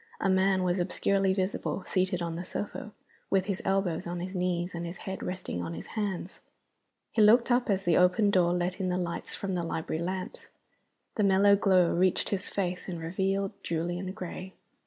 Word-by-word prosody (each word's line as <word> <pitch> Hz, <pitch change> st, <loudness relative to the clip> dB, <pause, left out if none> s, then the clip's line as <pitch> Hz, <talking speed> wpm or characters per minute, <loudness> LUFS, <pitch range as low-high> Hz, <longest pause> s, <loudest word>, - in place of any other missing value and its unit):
A 195 Hz, -, +1 dB
man 190 Hz, 0 st, +3 dB
was 180 Hz, +1 st, +1 dB
obscurely 195 Hz, +2 st, +1 dB
visible, 190 Hz, 0 st, -1 dB
seated 185 Hz, -2 st, 0 dB
on 165 Hz, -1 st, -3 dB
the 175 Hz, -, -4 dB
sofa, 210 Hz, +3 st, -5 dB, 0.4 s
with 190 Hz, -1 st, +2 dB
his 195 Hz, -2 st, -2 dB
elbows 195 Hz, -4 st, 0 dB
on 175 Hz, 0 st, -3 dB
his 185 Hz, +2 st, -5 dB
knees 180 Hz, -1 st, -1 dB
and 170 Hz, 0 st, -4 dB
his 170 Hz, +2 st, -6 dB
head 190 Hz, 0 st, -4 dB
resting 180 Hz, -, -4 dB
on 85 Hz, -1 st, -4 dB
his 85 Hz, -, -7 dB
hands. 200 Hz, -3 st, -3 dB, 0.7 s
He 225 Hz, -, +2 dB
looked 235 Hz, +4 st, +6 dB
up 245 Hz, -1 st, +2 dB
as 195 Hz, -1 st, +1 dB
the 170 Hz, -, +4 dB
open 180 Hz, +3 st, +4 dB
door 180 Hz, -3 st, +4 dB
let 180 Hz, +2 st, -1 dB
in 185 Hz, -1 st, 0 dB
the 180 Hz, -, 0 dB
light 175 Hz, -2 st, -3 dB
from 195 Hz, -1 st, -3 dB
the 180 Hz, -, 0 dB
library 160 Hz, -1 st, -3 dB
lamps. 185 Hz, +1 st, -4 dB, 0.7 s
The 210 Hz, -, +2 dB
mellow 200 Hz, +1 st, +5 dB
glow 185 Hz, -3 st, +4 dB
reached 185 Hz, +1 st, +2 dB
his 195 Hz, -2 st, -1 dB
face 185 Hz, -1 st, -3 dB
and 175 Hz, -2 st, -4 dB
revealed 190 Hz, +4 st, -1 dB
Julian 175 Hz, +3 st, -2 dB
Gray. 185 Hz, -1 st, -7 dB
185 Hz, 190 wpm, -29 LUFS, 175-195 Hz, 0.7 s, looked